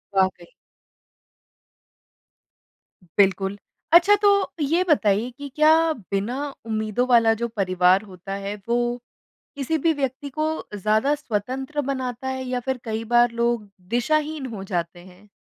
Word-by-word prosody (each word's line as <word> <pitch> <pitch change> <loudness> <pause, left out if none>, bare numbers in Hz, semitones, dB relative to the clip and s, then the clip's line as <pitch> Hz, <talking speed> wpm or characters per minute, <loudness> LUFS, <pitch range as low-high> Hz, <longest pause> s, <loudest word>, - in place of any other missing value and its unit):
वाक़ई। 190 -2 +1 2.7
बिल्कुल। 195 0 +2 0.4
अच्छा 355 +4 +7
तो 410 - +6 0.3
ये 325 +5 +2
बताइए 220 -5 +2
कि 285 0 -7
क्या 305 +1 +5 0.4
बिना 205 +7 -1 0.3
उम्मीदों 220 +2 -1
वाला 230 -2 +5
जो 235 - +1
परिवार 185 -3 +2
होता 185 +1 -8
है, 200 +1 -4
वो 240 +1 0 0.6
किसी 285 +3 -1
भी 320 +2 +2
व्यक्ति 275 -1 -3
को 310 - +1 0.3
ज़्यादा 215 +7 +2
स्वतंत्र 265 +3 -3
बनाता 255 -1 -4
है 260 0 -3
या 250 0 -2
फिर 265 -1 -1
कई 225 -1 -3
बार 240 0 +5
लोग 235 -2 -1 0.2
दिशाहीन 300 +5 0
हो 195 - -6
जाते 175 -2 -3
हैं? 185 +3 -17
235 Hz, 130 wpm, -23 LUFS, 200-270 Hz, 2.7 s, अच्छा